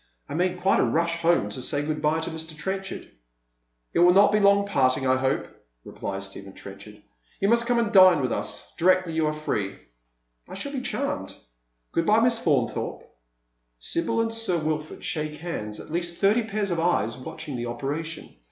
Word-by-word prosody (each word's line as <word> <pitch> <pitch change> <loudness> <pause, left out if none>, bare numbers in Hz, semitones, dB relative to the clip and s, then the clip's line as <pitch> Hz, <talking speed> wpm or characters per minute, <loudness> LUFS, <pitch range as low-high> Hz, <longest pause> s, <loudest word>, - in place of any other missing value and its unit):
I - - -7
made 180 +3 0
quite 190 +2 +3
a - - +4
rush 170 +1 +1
home 170 -10 +2
to 130 - -5
say 145 +3 -1
good 150 0 -2
bye 155 +1 +1
to 160 - -3
Mr. 160 -1 -7
Trenchard." 190 +4 -4 0.9
"It - - +1
will 180 +1 +6
not 205 +1 +6
be 210 - +3
a - - 0
long 200 0 +5
parting, 135 -8 +2
I 130 0 +4
hope," 130 0 0 0.4
replies 100 0 -5
Stephen 95 0 -9
Trenchard. 105 +2 -11 0.2
" - - -35
You 195 - +2
must 235 0 +3
come 245 -1 +2
and 230 -2 +1
dine 185 -5 +7
with 130 -3 -1
us - - -4
directly 185 -1 +3
you 160 -1 +1
are - - +1
free." 105 -10 -3 0.3
" - - -46
I - - -7
shall 280 +9 -4
be 270 -3 -3
charmed. 280 +3 -3 0.6
Good 165 - 0
bye 215 +1 +5
Miss 230 0 +2
Faunthorpe." 135 -8 0 0.7
Sibyl 170 - 0
and 225 0 -1
Sir 225 -6 0
Wilford 155 -1 -3
shake 150 -1 -3
hands, 105 -11 -5
at - - -10
least 170 +1 -2
thirty 215 +3 +3
pairs 210 -2 -2
of 170 - 0
eyes 165 -10 +1
watching 140 +3 -7
the 120 0 -3
operation. 145 +7 -5
165 Hz, 200 wpm, -25 LUFS, 130-195 Hz, 0.9 s, dine